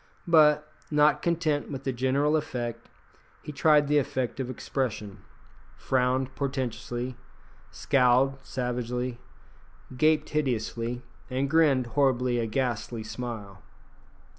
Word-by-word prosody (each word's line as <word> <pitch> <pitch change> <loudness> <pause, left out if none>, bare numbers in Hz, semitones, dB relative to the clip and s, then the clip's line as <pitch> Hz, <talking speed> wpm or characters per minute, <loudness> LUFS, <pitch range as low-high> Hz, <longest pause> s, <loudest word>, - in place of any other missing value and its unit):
But, 150 -2 +5 0.2
not 150 0 +4
content 160 -4 0
with 135 -2 -6
the 135 - -1
general 135 +5 +1
effect, 120 -6 -3 0.5
he - - -6
tried 150 +1 +4
the 150 0 +4
effect 130 -2 -2
of 130 -1 -3
expression 110 -5 -3 0.6
frowned 130 0 0
portentously, 130 -2 -3 0.5
scowled 135 0 +2
savagely, 125 -1 -3 0.8
gaped 155 +3 +2
hideously, 120 -4 -2 0.3
and 130 +2 0
grinned 140 -4 +3
horribly 130 -3 +2
a 115 - -1
ghastly 120 -1 -2
smile. 110 -4 -7
130 Hz, 105 wpm, -27 LUFS, 120-145 Hz, 0.8 s, But